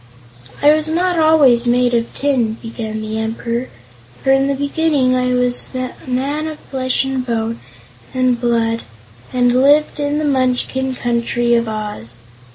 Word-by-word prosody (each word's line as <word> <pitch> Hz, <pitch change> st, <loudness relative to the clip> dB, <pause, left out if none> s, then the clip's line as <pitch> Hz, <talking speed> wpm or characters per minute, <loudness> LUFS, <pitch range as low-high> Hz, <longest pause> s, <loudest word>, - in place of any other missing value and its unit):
"I 295 Hz, +1 st, +7 dB
was 310 Hz, 0 st, +2 dB
not 350 Hz, +2 st, 0 dB
always 285 Hz, -7 st, +4 dB
made 245 Hz, 0 st, +2 dB
of 235 Hz, -1 st, 0 dB
tin," 255 Hz, -6 st, 0 dB
began 225 Hz, -2 st, -6 dB
the 215 Hz, 0 st, -3 dB
Emperor, 230 Hz, +2 st, -3 dB, 0.5 s
"for 270 Hz, -, +3 dB
in 270 Hz, 0 st, +3 dB
the 280 Hz, -, 0 dB
beginning 285 Hz, -2 st, +1 dB
I 250 Hz, 0 st, +1 dB
was 250 Hz, 0 st, -1 dB
a 255 Hz, 0 st, -3 dB, 0.2 s
man 280 Hz, +5 st, -1 dB
of 310 Hz, -1 st, -6 dB
flesh 260 Hz, -2 st, -1 dB
and 265 Hz, -1 st, -2 dB
bone 230 Hz, -2 st, -2 dB, 0.5 s
and 255 Hz, -2 st, +1 dB
blood 230 Hz, -1 st, +1 dB, 0.5 s
and 245 Hz, -1 st, +2 dB
lived 295 Hz, +2 st, +3 dB
in 290 Hz, 0 st, 0 dB
the 305 Hz, -, -1 dB
Munchkin 260 Hz, -1 st, 0 dB
Country 240 Hz, 0 st, 0 dB
of 235 Hz, -1 st, +2 dB
Oz. 210 Hz, -, -6 dB
255 Hz, 155 wpm, -17 LUFS, 235-280 Hz, 0.5 s, I